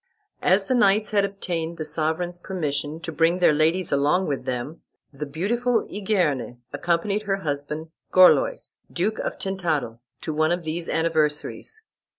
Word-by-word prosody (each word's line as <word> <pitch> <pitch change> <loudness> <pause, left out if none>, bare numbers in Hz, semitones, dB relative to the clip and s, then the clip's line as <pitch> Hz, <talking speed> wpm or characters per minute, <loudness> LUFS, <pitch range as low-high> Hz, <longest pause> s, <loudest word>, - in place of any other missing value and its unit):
As 195 +2 +3
the 255 - 0
knights 210 -3 +3
had 205 -2 +3
obtained 175 -4 -3
the 155 - -4
sovereign's 160 +3 -1
permission 150 -4 -3
to 165 - -5
bring 165 +2 +2
their 180 -4 +4
ladies 165 +4 +1
along 145 +7 +2
with 140 -5 -3
them, 130 +6 -4 0.3
the 145 +2 -5
beautiful 225 - 0
Igerne 180 - -1 0.2
accompanied 170 +7 0
her 195 - +3
husband, 150 0 -4 0.2
Gorlois, - - +4
Duke 205 +5 -1
of - - -3
Tintadel, 165 -11 -2 0.2
to 155 - -3
one 155 +2 +2
of 175 0 -1
these 165 +2 -4
anniversaries. 160 - -1
170 Hz, 150 wpm, -24 LUFS, 150-195 Hz, 0.3 s, their